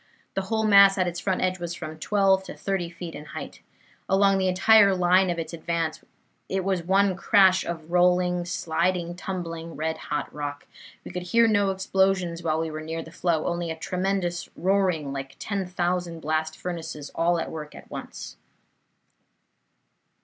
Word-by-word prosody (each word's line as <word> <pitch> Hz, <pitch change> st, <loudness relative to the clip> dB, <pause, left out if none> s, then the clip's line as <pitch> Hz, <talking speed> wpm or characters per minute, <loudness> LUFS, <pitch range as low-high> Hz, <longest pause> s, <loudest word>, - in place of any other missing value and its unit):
The 195 Hz, -, -1 dB
whole 220 Hz, -1 st, +1 dB
mass 200 Hz, -2 st, +7 dB
at 185 Hz, -, +2 dB
its 175 Hz, 0 st, -3 dB
front 190 Hz, -2 st, -1 dB
edge 185 Hz, 0 st, 0 dB
was 175 Hz, 0 st, -4 dB
from 155 Hz, -2 st, -7 dB
twelve 195 Hz, +1 st, +2 dB
to -, -, -8 dB
thirty 190 Hz, -3 st, -2 dB
feet 170 Hz, -1 st, -8 dB
in 150 Hz, -, -8 dB
height. 140 Hz, -, -8 dB, 0.5 s
Along 195 Hz, 0 st, +4 dB
the 190 Hz, -, +1 dB
entire 200 Hz, +2 st, +5 dB
line 180 Hz, +1 st, +4 dB
of 175 Hz, -, -1 dB
its 165 Hz, +1 st, -5 dB
advance 165 Hz, -1 st, -2 dB, 0.5 s
it 190 Hz, 0 st, -1 dB
was 190 Hz, -2 st, 0 dB
one 190 Hz, +2 st, +2 dB
crash 190 Hz, 0 st, +4 dB
of 165 Hz, -1 st, -6 dB
rolling, 180 Hz, 0 st, +3 dB
sliding, 175 Hz, +1 st, -1 dB
tumbling 170 Hz, -3 st, -5 dB
red 160 Hz, +1 st, -2 dB
hot 150 Hz, -, -2 dB
rock. 145 Hz, -1 st, -5 dB, 0.4 s
We -, -, -7 dB
could 180 Hz, -, -4 dB
hear 230 Hz, +6 st, +3 dB
no 205 Hz, -2 st, +3 dB
explosions 190 Hz, -2 st, +1 dB
while 160 Hz, -2 st, 0 dB
we 160 Hz, -1 st, -2 dB
were 155 Hz, 0 st, -5 dB
near 160 Hz, +1 st, -4 dB
the 160 Hz, -, -13 dB
flow, 165 Hz, -2 st, 0 dB
only 170 Hz, -1 st, -2 dB
a 160 Hz, -, -3 dB
tremendous 180 Hz, +1 st, -2 dB
roaring 180 Hz, -6 st, +1 dB
like 135 Hz, 0 st, -6 dB
ten 200 Hz, -3 st, -3 dB
thousand 175 Hz, -2 st, -2 dB
blast 155 Hz, +1 st, -1 dB
furnaces 160 Hz, -4 st, -6 dB
all 170 Hz, +1 st, +2 dB
at -, -, -4 dB
work 155 Hz, -2 st, -7 dB
at -, -, -13 dB
once." -, -, -8 dB
175 Hz, 170 wpm, -25 LUFS, 165-190 Hz, 0.5 s, mass